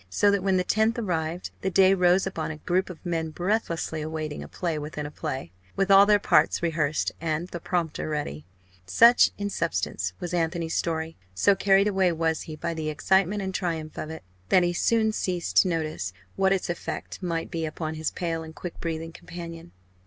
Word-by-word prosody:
So 200 - +3
that, 200 -1 +1
when 190 0 +2
the 180 - +2
10th 220 +5 +2
arrived, 175 -5 -2
the 190 - 0
day 190 +1 +5
rose 180 0 +4
upon 165 -5 -3
a 155 - -5
group 180 +5 0
of 180 0 -10
men 165 -2 -1
breathlessly 170 -3 -1
awaiting 155 -1 -4
a - - -7
play 165 -4 -3
within 150 0 -5
a 145 - -6
play 130 - -5 0.2
with 195 0 +1
all 195 +1 +8
their 210 -1 +6
parts 195 - +3
rehearsed, 155 -3 0
and 165 +1 -1
the 175 - -5
prompter 170 -3 -2
ready. 145 - -3 0.4
Such 235 - +6
in 205 0 -3
substance, 95 - -1
was 175 0 -5
Anthony's 165 -1 -1
story. 160 -1 -2 0.2
So 200 - +4
carried 195 +1 +4
away 190 -3 +2
was 160 -1 0
he 155 - -5
by 170 +2 -3
the 160 -1 -3
excitement 190 +6 +2
and 190 0 -3
triumph 165 -4 -3
of 155 - -4
it, 160 - -8 0.3
that 185 - +5
he 175 0 +1
soon 220 +4 +2
ceased 180 -5 -2
to - - +7
notice 155 - -2 0.2
what 190 0 +2
its 195 -1 +1
effect 175 +2 -5
might 165 -3 -2
be 165 -1 -2
upon 155 0 -4
his 155 0 -2
pale 165 -2 -3
and 160 0 -10
quick 175 - -7
breathing 165 -1 -4
companion. 170 - -9
170 Hz, 195 wpm, -26 LUFS, 160-190 Hz, 0.4 s, all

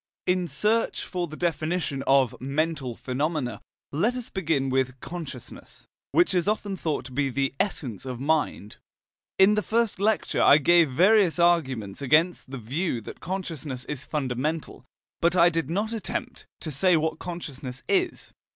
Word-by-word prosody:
In 180 -1 +1
search 220 +6 0
for 175 -1 -3
the 155 0 -9
definition 165 -4 -1
of 135 -3 +4
"mental 140 -2 -1
phenomena," 130 -3 -2 0.3
let 210 - +1
us 250 -2 -6
begin 155 -8 0
with 130 0 0
"consciousness," 170 +1 -9 0.3
which 350 - +3
is 180 0 +1
often 205 -2 -1
thought 155 -7 -2
to 130 - -9
be 140 +2 0
the 135 +1 -1
essence 130 - -2
of 130 -2 -5
mind. 145 -7 -1 0.6
In 190 +2 +6
the 210 - +2
first 230 -2 0
lecture 215 +2 +1
I 140 - +8
gave 165 +1 +5
various 185 +5 +4
arguments 135 - +1
against 155 +3 +2
the 135 - -6
view 130 - -2
that - - -10
consciousness 160 -8 -5
is 145 -3 -4
fundamental, 145 +3 -3 0.4
but 170 +1 +3
I 175 -1 +6
did 165 -4 -2
not 210 +6 -1
attempt 225 - -5
to 155 - -4
say 180 +5 +3
what 160 0 -1
consciousness 140 -7 -7
is. 370 -2 0
160 Hz, 155 wpm, -26 LUFS, 135-180 Hz, 0.6 s, I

